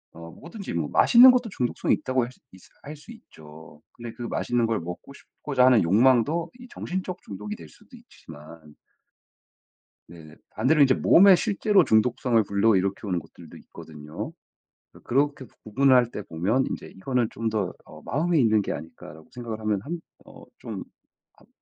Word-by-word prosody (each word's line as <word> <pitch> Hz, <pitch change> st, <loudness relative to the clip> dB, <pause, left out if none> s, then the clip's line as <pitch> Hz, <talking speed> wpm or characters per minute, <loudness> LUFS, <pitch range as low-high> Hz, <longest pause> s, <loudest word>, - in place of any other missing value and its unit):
어 85 Hz, 0 st, -11 dB
뭐든지 175 Hz, -, -9 dB
뭐 80 Hz, -3 st, -2 dB
맛있는 250 Hz, +2 st, +7 dB
것도 245 Hz, -3 st, -1 dB
중독성이 125 Hz, -9 st, -1 dB
있다고 130 Hz, -1 st, -1 dB
할 125 Hz, -, -6 dB
수 -, -, -24 dB
있스 95 Hz, -, -18 dB
할 150 Hz, +2 st, -9 dB
수 150 Hz, +10 st, -15 dB
있죠. 80 Hz, -, -15 dB
근데 120 Hz, -1 st, -9 dB
그 -, -, -13 dB
맛있는 120 Hz, 0 st, -1 dB
걸 115 Hz, -, -1 dB
먹고 90 Hz, +10 st, -9 dB
싶고자 135 Hz, -2 st, -2 dB
하는 125 Hz, -4 st, +5 dB
욕망도 130 Hz, -, +2 dB
이 250 Hz, -, -12 dB
정신적 185 Hz, 0 st, -5 dB
중독이 105 Hz, +1 st, -7 dB
될 80 Hz, -, -13 dB
수도 -, -, -18 dB
있지만 75 Hz, 0 st, -15 dB, 1.3 s
네네. 80 Hz, -2 st, -15 dB
반대로 140 Hz, +7 st, +2 dB
이제 130 Hz, -2 st, +4 dB
몸에 195 Hz, +1 st, +6 dB
실제로 205 Hz, -2 st, +2 dB
중독성을 115 Hz, +1 st, +2 dB
불러 100 Hz, +1 st, +2 dB
일으켜 100 Hz, +2 st, -2 dB
오는 90 Hz, -2 st, -1 dB
것들도 80 Hz, -, -13 dB
있거든요. 75 Hz, -1 st, -10 dB, 0.6 s
그 -, -, -17 dB
그렇게 140 Hz, +1 st, -1 dB, 0.2 s
구분을 130 Hz, +5 st, +3 dB
할 120 Hz, -2 st, +3 dB
때 105 Hz, -, -6 dB
보면 100 Hz, +12 st, -1 dB
인제 -, -, -6 dB
이거는 120 Hz, +3 st, -2 dB
좀 115 Hz, 0 st, -3 dB
더 105 Hz, -4 st, -2 dB
어 -, -, -14 dB
'마음에 165 Hz, +4 st, 0 dB
있는 110 Hz, -4 st, +3 dB
게 -, -, -4 dB
아닐까.' 80 Hz, 0 st, -10 dB
라고 80 Hz, 0 st, -16 dB
생각을 115 Hz, -3 st, -7 dB
하면 105 Hz, -2 st, -1 dB
한 170 Hz, +2 st, -5 dB, 0.3 s
어 -, -, -15 dB, 0.2 s
좀 -, -, -7 dB, 0.5 s
합 -, -, -25 dB
115 Hz, 345 characters per minute, -24 LUFS, 95-140 Hz, 1.3 s, 맛있는